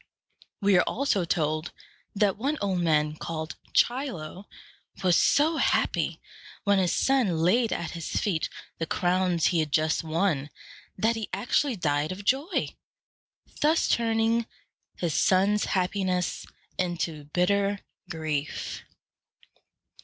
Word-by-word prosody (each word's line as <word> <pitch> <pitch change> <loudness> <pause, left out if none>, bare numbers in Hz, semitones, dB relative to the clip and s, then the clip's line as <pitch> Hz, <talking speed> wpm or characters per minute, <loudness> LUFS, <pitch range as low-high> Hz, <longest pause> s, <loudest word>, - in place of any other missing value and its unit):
We 200 -2 +5
are - - +2
also 220 -8 0
told 155 -1 -1 0.4
that 200 -1 +2
one 280 +8 -1
old 195 -3 0
man 150 -3 +2
called 160 0 -5 0.2
Chi´lo 220 - 0 0.6
was 180 -2 +4
so 315 - +3
happy - - +1 0.4
when 200 -1 +3
his 180 -2 +2
son 250 -11 +2
laid 215 +8 +2
at 170 - -3
his 170 -2 -6
feet 175 -7 -1 0.3
the 165 - -2
crowns 180 -1 +1
he 170 - +2
had 155 -2 -1
just 155 +2 +1
won, 160 -3 0 0.5
that 225 +4 +2
he 225 -2 -4
actually 245 +6 0
died 150 -4 0
of 195 +2 -7
joy, 285 - +1 0.9
thus 310 +2 +3
turning 225 0 +1 0.5
his 170 -4 -2
son's 195 +5 +3
happiness 185 -1 -1 0.3
into 165 -4 -2
bitter 200 +5 +1 0.3
grief. 155 -3 -3
185 Hz, 120 wpm, -27 LUFS, 160-215 Hz, 0.9 s, We